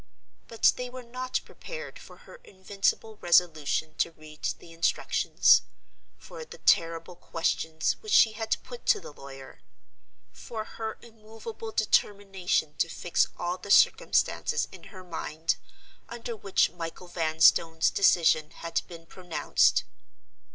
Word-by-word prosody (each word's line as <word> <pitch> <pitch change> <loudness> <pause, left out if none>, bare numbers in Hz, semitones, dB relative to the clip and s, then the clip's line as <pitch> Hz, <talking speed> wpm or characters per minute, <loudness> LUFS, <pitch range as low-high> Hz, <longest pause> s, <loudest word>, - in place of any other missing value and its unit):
But 230 - +3
they 250 0 -4
were 255 0 -9
not 255 +2 -3
prepared 485 -1 -9
for - - -14
her - - -13
invincible 200 +3 -2
resolution 160 -3 +2
to - - +2
read 155 -1 -15
the 165 - -15
Instructions; 165 +1 +3 0.6
for 475 - -10
the - - -12
terrible 165 +1 +1
questions 160 -2 -1
which 430 - -7
she 225 - +6
had 220 0 -2
put 485 - -11
to 425 - +4
the 150 - -11
lawyer; 135 -1 -12 0.7
for 220 -2 -7
her 220 0 -6
immovable 225 - -9
determination 195 - 0
to 165 - +1
fix 175 +1 0
all 175 +1 -3
the 200 - -11
circumstances - - +3
in - - -13
her 185 -3 -12
mind, 165 -2 -3 0.5
under 235 0 -6
which 200 -2 +1
Michael 165 +1 -7
Vanstone's 160 -1 +3
decision 160 -5 +3
had 170 0 -3
been 165 -1 -11
pronounced. 180 0 +1
180 Hz, 130 wpm, -28 LUFS, 165-225 Hz, 0.7 s, she